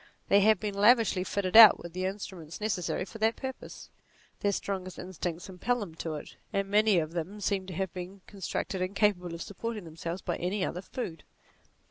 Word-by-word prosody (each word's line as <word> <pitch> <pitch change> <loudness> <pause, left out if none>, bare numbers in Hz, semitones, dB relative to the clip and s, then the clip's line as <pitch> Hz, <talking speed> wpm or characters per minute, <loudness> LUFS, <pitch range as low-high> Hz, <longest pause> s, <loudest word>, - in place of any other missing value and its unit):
They 200 - +6
have 215 +2 +5
been 210 -2 -3
lavishly 210 -2 +4
fitted 190 0 -2
out 225 -2 +11
with 170 -1 -10
the 185 +1 -2
instruments 185 -4 -6
necessary 190 -4 -1
for 225 - -11
that 220 +1 +2
purpose; 265 -1 -8 0.5
their 205 - +1
strongest 190 -2 -4
instincts 180 -2 -5
impel 220 +7 -1
them 195 -7 -6
to 160 -1 -4
it, 150 - -9
and 195 0 0
many 210 -1 +4
of 155 -1 0
them 175 +5 -4
seem 195 -1 -1
to 185 - -6
have 190 0 -2
been 185 +1 -7
constructed 190 -1 -4
incapable 185 -2 +1
of 165 - -5
supporting 215 +1 -5
themselves 165 +2 -6
by 175 - -2
any 185 +2 -1
other 180 - -4
food. 185 -5 -6
190 Hz, 185 wpm, -29 LUFS, 175-210 Hz, 0.5 s, out